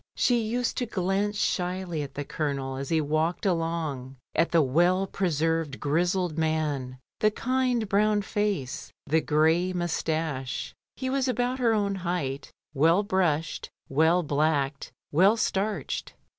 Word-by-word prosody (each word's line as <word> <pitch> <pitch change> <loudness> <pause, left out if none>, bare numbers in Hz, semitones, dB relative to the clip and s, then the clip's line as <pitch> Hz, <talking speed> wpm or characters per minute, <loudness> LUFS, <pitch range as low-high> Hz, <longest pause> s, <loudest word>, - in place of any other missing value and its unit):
She 245 -2 +3
used 235 +2 -1
to 245 - -1
glance 200 0 0
shyly 180 -4 -1
at 140 - -7
the 145 - -4
Colonel 140 -3 -2
as 135 0 -5
he 160 - +2
walked 155 +5 0
along; 165 -7 -1 0.2
at 165 - +2
the 165 -2 +4
well 175 +8 +3
preserved 165 -6 -1
grizzled 175 +2 0
man, 150 -5 -1 0.2
the 215 - +4
kind 250 0 0
brown 205 +1 +2
face, 200 -11 -2
the 160 +2 +2
grey 160 +5 +2
moustache. 160 -6 -2 0.2
He 260 -1 -3
was 270 -1 +1
about 250 +1 0
her 230 -3 +3
own 200 -2 +1
height, 160 -6 -3 0.2
well 165 +7 +4
brushed, 170 -6 0 0.2
well 160 +5 +3
blacked, 145 -2 0 0.2
well 190 +9 +5
starched. 210 0 -2
170 Hz, 135 wpm, -27 LUFS, 150-200 Hz, 0.2 s, well